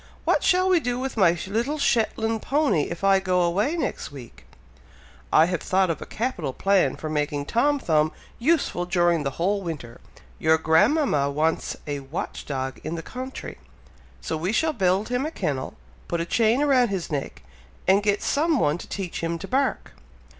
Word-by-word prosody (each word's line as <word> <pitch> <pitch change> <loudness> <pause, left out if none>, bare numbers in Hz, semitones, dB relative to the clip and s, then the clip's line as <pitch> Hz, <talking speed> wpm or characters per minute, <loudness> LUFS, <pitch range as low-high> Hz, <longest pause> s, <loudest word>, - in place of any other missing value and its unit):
What - - +3
shall 370 0 +3
we 370 -2 +4
do 245 -5 -2
with 265 +1 -3
my 175 -5 +4
little 235 +10 -1
Shetland 225 -4 +1
pony 280 - +1
if 170 +2 -7
I 195 -1 +5
go 185 -1 +1
away 200 - +1
next 325 - -3
week?" 120 - -12 0.9
"I 160 - +6
have 180 -2 -2
thought 190 -2 +2
of 165 - -5
a - - -7
capital 215 - -3
plan 195 +4 +2
for 155 - -6
making 150 -1 -1
Tom 285 - +2
Thumb 155 - +1 0.3
useful 255 - +1
during 175 -2 +2
the 140 - -1
whole 195 +4 +1
winter! 150 -10 -7 0.4
Your 160 0 +4
grandmama 160 - +3
wants 155 +3 -1
a 145 -1 -3
watch 140 +6 -6
dog 130 -2 -4
in 155 +2 -3
the 165 - -5
country, 260 +1 -7 0.6
so 160 - -3
we 175 +5 -1
shall 320 +7 +1
build 195 -1 +1
him 250 +1 0
a 305 - -1
kennel 140 - -3 0.3
put 170 - -2
a 170 - -1
chain 225 +7 +2
round 260 -5 +4
his 190 -4 -3
neck, 140 -2 -4 0.4
and 195 +2 +5
get 205 0 0
some 315 +2 +2
one 150 -1 +1
to - - -9
teach 190 -3 -5
him 165 0 -2
to - - -8
bark." 270 +2 0
185 Hz, 180 wpm, -24 LUFS, 160-245 Hz, 0.9 s, I